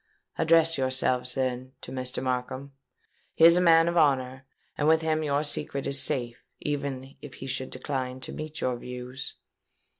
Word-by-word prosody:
Address 165 Hz, -1 st, +4 dB
yourselves, 130 Hz, -1 st, 0 dB
then, 130 Hz, -1 st, -2 dB
to -, -, -9 dB
Mr. 130 Hz, 0 st, -4 dB
Markham: 130 Hz, +2 st, -3 dB, 0.6 s
he 165 Hz, -, +6 dB
is 170 Hz, 0 st, +9 dB
a 180 Hz, -, +4 dB
man 165 Hz, -1 st, +6 dB
of 170 Hz, -, 0 dB
honour; 130 Hz, -4 st, +2 dB, 0.3 s
and 150 Hz, -, 0 dB
with 160 Hz, 0 st, +4 dB
him 155 Hz, -1 st, +1 dB
your 145 Hz, -1 st, +1 dB
secret 145 Hz, -2 st, -2 dB
is 140 Hz, 0 st, +1 dB
safe, 120 Hz, -5 st, -2 dB, 0.2 s
even 140 Hz, -2 st, -3 dB
if 145 Hz, -, -10 dB
he -, -, -8 dB
should 130 Hz, 0 st, -3 dB
decline 130 Hz, -1 st, -4 dB
to 125 Hz, -, -6 dB
meet 155 Hz, 0 st, -6 dB
your 125 Hz, -1 st, 0 dB
views.' 125 Hz, +2 st, -6 dB
135 Hz, 170 wpm, -27 LUFS, 130-155 Hz, 0.6 s, is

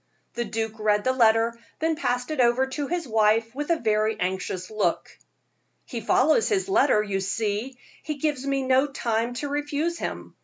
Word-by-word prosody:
The 240 Hz, 0 st, -2 dB
duke 225 Hz, -1 st, -4 dB
read 210 Hz, -1 st, +2 dB
the 260 Hz, -, +2 dB
letter, 230 Hz, -1 st, +3 dB, 0.2 s
then 320 Hz, 0 st, 0 dB
passed 250 Hz, -3 st, -2 dB
it 310 Hz, -, -3 dB
over 240 Hz, +2 st, +3 dB
to 275 Hz, +2 st, -4 dB
his 340 Hz, -2 st, -2 dB
wife 225 Hz, 0 st, +2 dB
with 295 Hz, +3 st, -4 dB
a 335 Hz, -, +4 dB
very 215 Hz, -5 st, 0 dB
anxious 185 Hz, 0 st, -3 dB
look. 215 Hz, -1 st, -1 dB, 0.7 s
"He 235 Hz, -3 st, -5 dB
follows 310 Hz, -, +3 dB
his 395 Hz, -3 st, 0 dB
letter, 290 Hz, -, +3 dB
you 200 Hz, -2 st, -2 dB
see; 210 Hz, +5 st, -2 dB, 0.2 s
he 305 Hz, -, -4 dB
gives 290 Hz, -2 st, -1 dB
me 275 Hz, -1 st, 0 dB
no 260 Hz, +2 st, +3 dB
time 235 Hz, -3 st, -2 dB
to 290 Hz, -, -3 dB
refuse 295 Hz, +4 st, -2 dB
him. -, -, -5 dB
245 Hz, 180 wpm, -25 LUFS, 220-290 Hz, 0.7 s, a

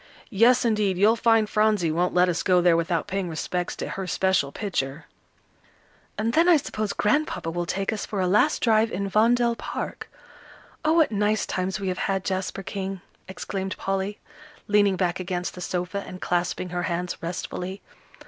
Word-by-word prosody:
Yes, 240 Hz, +4 st, +4 dB
indeed, 210 Hz, -5 st, +1 dB
you'll 210 Hz, +4 st, +5 dB
find 225 Hz, -1 st, +3 dB
Phronsie 210 Hz, -6 st, +2 dB
won't 175 Hz, +3 st, 0 dB
let 180 Hz, 0 st, +5 dB
us 175 Hz, -1 st, 0 dB
go 180 Hz, -1 st, +3 dB
there 175 Hz, -1 st, +4 dB
without 165 Hz, 0 st, 0 dB
paying 195 Hz, -2 st, -3 dB
respects 175 Hz, +2 st, -3 dB
to -, -, -5 dB
her 190 Hz, -1 st, -4 dB
special 180 Hz, -3 st, +1 dB
picture." 150 Hz, -7 st, -3 dB, 1.1 s
"And 225 Hz, +2 st, 0 dB
then 335 Hz, +2 st, +4 dB
I 340 Hz, -, +7 dB
suppose 215 Hz, -7 st, -3 dB
Grandpapa 210 Hz, -, 0 dB
will 175 Hz, 0 st, -3 dB
take 195 Hz, +4 st, -1 dB
us 215 Hz, -, -4 dB
for 205 Hz, -, -4 dB
a 185 Hz, -, +2 dB
last 210 Hz, +11 st, +2 dB
drive 225 Hz, -1 st, +3 dB
in 200 Hz, +2 st, -2 dB
Vondel 235 Hz, +3 st, +3 dB
Park. -, -, -6 dB, 0.7 s
Oh, 310 Hz, 0 st, +3 dB
what 325 Hz, -5 st, +4 dB
nice 210 Hz, +1 st, +1 dB
times 185 Hz, +2 st, -2 dB
we 195 Hz, -1 st, -2 dB
have 185 Hz, -, -3 dB
had, 195 Hz, -1 st, -1 dB
Jasper 190 Hz, +1 st, -2 dB
King!" 195 Hz, -1 st, -5 dB, 0.3 s
exclaimed 190 Hz, 0 st, -5 dB
Polly, 195 Hz, +1 st, -2 dB, 0.5 s
leaning 205 Hz, -2 st, +4 dB
back 180 Hz, -1 st, -1 dB
against 180 Hz, -1 st, -3 dB
the 180 Hz, -, -9 dB
sofa, 180 Hz, +3 st, -3 dB
and 185 Hz, -, -9 dB
clasping 180 Hz, +1 st, -1 dB
her 175 Hz, 0 st, -2 dB
hands 175 Hz, 0 st, -2 dB
restfully. 180 Hz, +2 st, -5 dB
190 Hz, 175 wpm, -25 LUFS, 180-215 Hz, 1.1 s, I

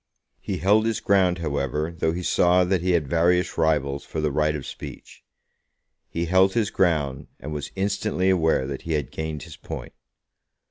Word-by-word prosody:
He -, -, -4 dB
held 105 Hz, +6 st, +3 dB
his 115 Hz, -, 0 dB
ground, 95 Hz, -3 st, +3 dB
however, 75 Hz, 0 st, -2 dB
though 80 Hz, -1 st, 0 dB
he 90 Hz, +2 st, -4 dB
saw 90 Hz, +1 st, +4 dB
that 90 Hz, 0 st, +1 dB
he 90 Hz, 0 st, +1 dB
had 80 Hz, -5 st, +1 dB
various 85 Hz, +4 st, +2 dB
rivals 70 Hz, -4 st, +1 dB
for 80 Hz, -, -5 dB
the 75 Hz, -1 st, 0 dB
right 75 Hz, +1 st, +1 dB
of 70 Hz, -, -5 dB
speech. -, -, -10 dB, 0.9 s
He 85 Hz, +1 st, -2 dB
held 95 Hz, +2 st, +4 dB
his 110 Hz, -4 st, 0 dB
ground, 75 Hz, -7 st, 0 dB
and 75 Hz, +3 st, -6 dB
was 75 Hz, -1 st, -5 dB
instantly 95 Hz, -1 st, 0 dB
aware 80 Hz, -7 st, +2 dB
that 70 Hz, 0 st, -5 dB
he 80 Hz, -, -3 dB
had 75 Hz, -3 st, -2 dB
gained 80 Hz, -3 st, -4 dB
his -, -, -11 dB
point. -, -, -8 dB
85 Hz, 180 wpm, -24 LUFS, 75-95 Hz, 0.9 s, saw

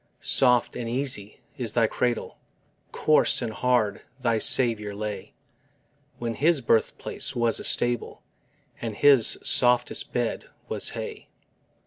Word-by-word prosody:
Soft 125 Hz, -2 st, +2 dB
and 115 Hz, -1 st, -5 dB
easy 125 Hz, -5 st, -2 dB, 0.2 s
is 115 Hz, -4 st, -2 dB
thy 115 Hz, -2 st, +3 dB
cradle: 120 Hz, +1 st, -2 dB, 0.5 s
Coarse 155 Hz, -, +2 dB
and 115 Hz, -3 st, -4 dB
hard 120 Hz, -4 st, 0 dB, 0.2 s
thy 115 Hz, -3 st, 0 dB
Saviour 110 Hz, -4 st, +3 dB
lay, 105 Hz, 0 st, -6 dB, 0.8 s
When 115 Hz, -1 st, -4 dB
His 155 Hz, +5 st, +2 dB
birthplace 115 Hz, -3 st, -1 dB
was 120 Hz, -2 st, +1 dB
a -, -, -7 dB
stable 120 Hz, -1 st, 0 dB, 0.6 s
And 115 Hz, -3 st, -4 dB
His 140 Hz, -4 st, +5 dB
softest 125 Hz, -1 st, +1 dB
bed 120 Hz, -2 st, -3 dB, 0.2 s
was -, -, -1 dB
hay. -, -, -7 dB
120 Hz, 120 wpm, -25 LUFS, 110-125 Hz, 0.8 s, His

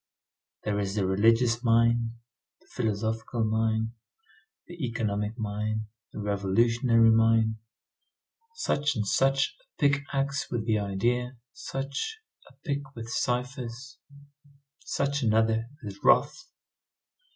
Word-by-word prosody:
There 105 Hz, -1 st, -1 dB
is 100 Hz, 0 st, -2 dB
the 100 Hz, -3 st, +1 dB
religious 115 Hz, +5 st, +3 dB
mine, 115 Hz, 0 st, +3 dB, 0.4 s
the -, -, -28 dB
philosophical 110 Hz, +1 st, -2 dB
mine, 110 Hz, 0 st, +1 dB, 0.7 s
the 175 Hz, -3 st, -8 dB
economic 110 Hz, -2 st, -2 dB
mine, 110 Hz, 0 st, -3 dB, 0.2 s
the -, -, -11 dB
revolutionary 115 Hz, +3 st, +3 dB
mine. 110 Hz, 0 st, +3 dB, 1.0 s
Such 150 Hz, -, 0 dB
and 105 Hz, -2 st, -1 dB
such 135 Hz, +5 st, +2 dB
a -, -, -29 dB, 0.2 s
pick 140 Hz, -2 st, +3 dB
axe 140 Hz, 0 st, -1 dB
with 115 Hz, -3 st, -2 dB
the 110 Hz, -2 st, +2 dB
idea, 120 Hz, +6 st, -1 dB, 0.2 s
such 140 Hz, -, -4 dB, 0.3 s
a -, -, -21 dB
pick 140 Hz, -1 st, -1 dB
with 115 Hz, -1 st, -7 dB
ciphers. 125 Hz, +1 st, -3 dB, 0.8 s
Such 140 Hz, +1 st, -1 dB
another 110 Hz, 0 st, +2 dB
with 100 Hz, -1 st, -7 dB
wrath. 355 Hz, -, +3 dB
115 Hz, 110 wpm, -28 LUFS, 110-125 Hz, 1.0 s, religious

